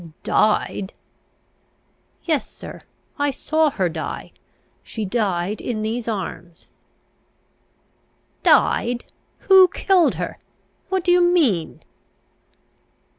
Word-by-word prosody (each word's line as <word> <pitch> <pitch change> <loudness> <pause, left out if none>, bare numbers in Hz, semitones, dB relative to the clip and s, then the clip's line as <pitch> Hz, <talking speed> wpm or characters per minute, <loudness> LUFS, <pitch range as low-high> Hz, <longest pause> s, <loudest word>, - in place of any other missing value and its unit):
"Died?" 205 -2 +1 1.3
"Yes, 315 -5 -1
sir. - - -11 0.4
I 290 0 +2
saw 310 +3 +1
her 190 -10 -1
die. 160 -2 -6 0.5
She 220 -2 -5
died 195 -2 -1
in 215 -3 -3
these 225 +2 -3
arms." 185 -5 -6 1.8
"Died? 240 0 +3 0.4
Who 380 -1 +7
killed 365 0 +2
her? - - -5 0.5
What 380 -2 0
do 355 - +2
you 355 0 +5
mean?" 310 - +1
240 Hz, 90 wpm, -21 LUFS, -, 1.8 s, Who